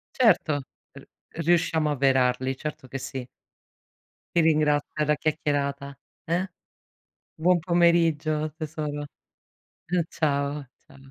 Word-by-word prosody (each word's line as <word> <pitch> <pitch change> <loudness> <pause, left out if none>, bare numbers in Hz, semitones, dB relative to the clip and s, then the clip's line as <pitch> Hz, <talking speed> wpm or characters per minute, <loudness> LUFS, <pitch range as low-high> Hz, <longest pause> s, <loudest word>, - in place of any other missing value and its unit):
Certo 175 - +3 0.3
r - - -14 0.3
riusciamo 160 -2 +2
avverarli, 130 -2 +2
certo 150 -3 -6
che 135 - -5
sì. 130 -1 -5 1.1
Ti 170 - +2
ringrazio 150 -2 +2
per 150 -1 -1
la 150 - +3
chiacchierata. 140 -2 -2 0.3
Eh? 180 +3 -1 0.8
Buon 175 +3 +3
pomeriggio 165 -3 +2
tesoro. 150 -2 -4 0.8
Mh, 180 +1 0
ciao, 140 -2 -1 0.2
ciao. 135 - -18
150 Hz, 105 wpm, -26 LUFS, 140-165 Hz, 1.1 s, Certo